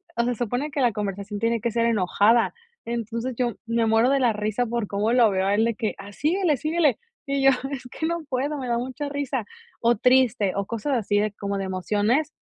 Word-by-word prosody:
o 235 - +1
se 245 - +1
supone 245 +6 -2
que 280 -1 -1
la 240 -4 +3
conversación 200 0 -4
tiene 230 0 0
que 235 - -1
ser 230 +1 +1
enojada. 220 +2 +3 0.3
Entonces 235 +1 -3
yo 240 -1 -1
me 230 0 +1
muero 225 +3 +3
de 275 0 +3
la 245 -4 +3
risa 215 +3 -1
por 235 -3 -2
cómo 205 +3 0
lo 240 -3 +5
veo 190 0 0
a 200 - +2
él 220 - +3
de 230 -1 0
que: 220 -3 -2
"A 200 +1 -10
síguele, 320 - +1
síguele", 310 -1 +1 0.3
y 275 -1 0
yo: 270 - +7 0.2
"Es 275 -3 -5
que 320 - -3
no 340 -1 -2
puedo 280 +3 -1
me 260 -3 -5
da 235 - +1
mucha 260 +4 -4
risa", 280 -5 -2 0.4
o 235 +1 +4
triste 250 -5 +3
o 200 - -1
cosas 230 +6 -2
así 205 -2 +1
de 210 0 0
como 200 -1 -3
de 195 - -2
emociones 210 - 0
235 Hz, 225 wpm, -24 LUFS, 210-260 Hz, 0.4 s, yo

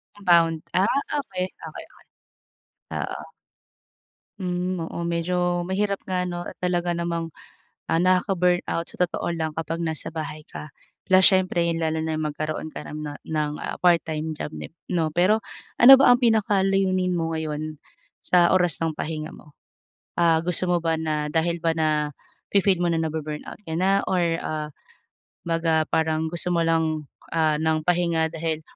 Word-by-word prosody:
Compound, 170 -5 +3
ah, 185 - +4 0.4
okey, 185 -7 -4 0.2
okey, - - -8
okey, - - -22 1.0
oo. - - -7 1.1
Hmm, 180 -1 -2
oo 170 +1 -4
medyo 175 +1 0
mahirap 200 +2 -1
nga 180 -1 0
no, 175 -1 -4
at - - -8
talaga 175 -1 -1
namang, 170 -1 -2 0.6
ah, 165 +1 +2
nakaka-burnout 180 -2 +1
sa - - -12
totoo 175 - -4
lang 160 -2 -3
kapag 165 0 -3
nasa 160 -2 -2
bahay 155 -1 -5
ka. 150 - -8 0.4
La 185 - +8
siyempre 185 -3 +4
yun 165 - 0
lalo 160 0 0
na 160 0 -2
yung 155 - -2
magkaroon 155 +1 -4
ka - - -6
ng 150 0 -6
ah 145 - -9
ng 155 -2 -1
ah, - - -4
part-time 160 -3 +2
job - - -4
dib 75 - -8 0.2
no. 165 -4 0
Pero 190 +6 +3 0.4
ano 265 +3 +10
ba 275 - +6
ang 245 - +3
pinakalayunin 195 -5 +2
mo 165 0 -1
ngayon, 155 -1 -4 0.5
sa 175 -1 +4
oras 175 -4 +2
ng 160 -1 -1
pahinga 155 0 -4
mo? 150 - -16 0.7
Ah, 165 -2 +4
gusto 180 +1 0
mo 175 - +3
ba 165 -1 +1
na 155 -2 -1
dahil 170 +2 +1
ba 165 - +3
nafi-feel 160 +5 0
mo 175 - +2
na 165 - +1
na-bu-burnout 155 -1 -5
ka 160 - -5
na 195 +2 +2
or 185 -1 +2 0.2
ah, 155 -1 -3 0.8
mag 165 -1 -1
ah, 160 -1 +3
parang 160 0 +1
gusto 175 +1 0
mo 170 - +2
lang 160 -2 +1 0.3
ah, 155 -2 +3
ng 160 0 +1
pahinga 170 -2 +1
dahil 160 -1 -3
165 Hz, 160 wpm, -24 LUFS, 160-180 Hz, 1.1 s, ano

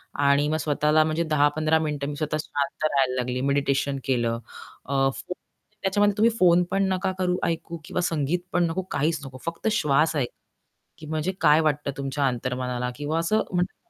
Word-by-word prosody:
आणि 140 +1 +3
मग 155 - +1
स्वतःला 150 +1 +2
म्हणजे 155 +2 0
10-15 155 +2 +3
मिनिटं 150 -3 -2
मी 145 - -5
स्वतः 155 +1 -2
शांत 145 +2 -3
राहायला 135 -4 +2
लागली, 125 0 -2
मेडिटेशन 140 0 +1
केलं. 120 -3 0 0.5
अ, 140 - -4 0.2
फोन 180 - -6 0.5
त्याच्यामध्ये 205 +1 +2
तुम्ही 225 +2 +5
फोन 180 -1 +5
पण 195 0 +2
नका 185 0 -1
करू, 180 -1 +1
ऐकू 170 0 -2
किंवा 180 - -2
संगीत 165 -1 0
पण 175 -1 +3
नको, 165 +3 -2
काहीच 160 +2 0
नको. 130 -1 -9
फक्त 165 +5 -3
श्वास 155 -4 +2
ऐका 130 -5 -1 0.7
की 155 - -10
म्हणजे 155 +3 -1
काय 150 +2 +6
वाटतं 150 -2 0
तुमच्या 140 0 -1
अंतर्मनाला 125 0 -2
किंवा 150 +3 -2
असं, 165 +6 +1
म्हणतात 180 0 -1
150 Hz, 175 wpm, -25 LUFS, 140-170 Hz, 0.7 s, काय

